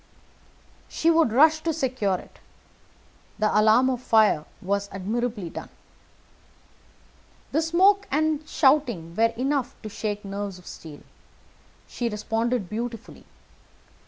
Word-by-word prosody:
She 330 - +2
would 325 -7 +3
rush 310 +6 +5
to 325 +1 -1
secure 255 - -1
it. - - -15 1.0
The 215 0 +1
alarm 215 +4 +5
of 255 -2 -1
fire 215 -10 +3
was 200 +1 -2
admirably 210 -1 -3
done. - - -8 1.8
The 315 - +1
smoke 380 +5 +3
and 310 +1 +1
shouting 245 - +2
were 230 +2 +3
enough 265 0 -1
to 215 - -6
shake 210 0 -4
nerves 200 -1 -5
of 180 - -17
steel. 155 -3 -11 0.9
She 240 -1 -3
responded 225 0 -2
beautifully. 230 +3 -6
230 Hz, 115 wpm, -25 LUFS, 205-280 Hz, 1.8 s, rush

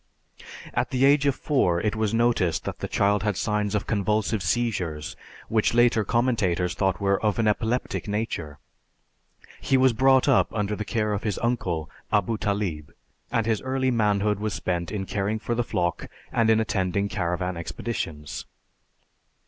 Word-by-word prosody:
At - - 0
the 130 +1 +2
age 140 0 +4
of 140 - +2
four 90 - +1
it 105 +3 -1
was 110 -2 0
noticed 115 -8 +1
that - - -5
the - - -3
child 100 0 +2
had 105 -2 -1
signs 105 +1 0
of 105 - -1
convulsive 105 0 0
seizures 90 -10 -1 0.3
which 110 +1 +1
later 120 -2 +4
commentators 100 -7 +1
thought 95 -2 0
were 100 -1 +1
of 105 -2 +1
an 115 -2 +2
epileptic 110 +4 -1
nature. 100 -8 -3 1.0
He 135 - +2
was 130 -1 +4
brought 130 +3 +4
up 135 - +4
under 105 -1 -1
the 105 - -4
care 105 0 0
of 100 - -2
his 105 -3 -2
uncle 95 -10 -1 0.2
Abu 105 +1 +1
Talib, 100 -8 -2 0.4
and 115 - +1
his 110 -2 0
early 130 0 0
manhood 105 -3 +1
was 105 -2 -2
spent 85 -2 -2
in 100 -3 -3
caring 100 +2 -1
for 115 +2 -3
the 120 +1 0
flock 85 -6 -2 0.2
and 115 -2 +2
in 110 0 +5
attending 100 -2 0
caravan 90 -3 -2
expeditions. 80 -4 -5
105 Hz, 165 wpm, -25 LUFS, 95-115 Hz, 1.0 s, in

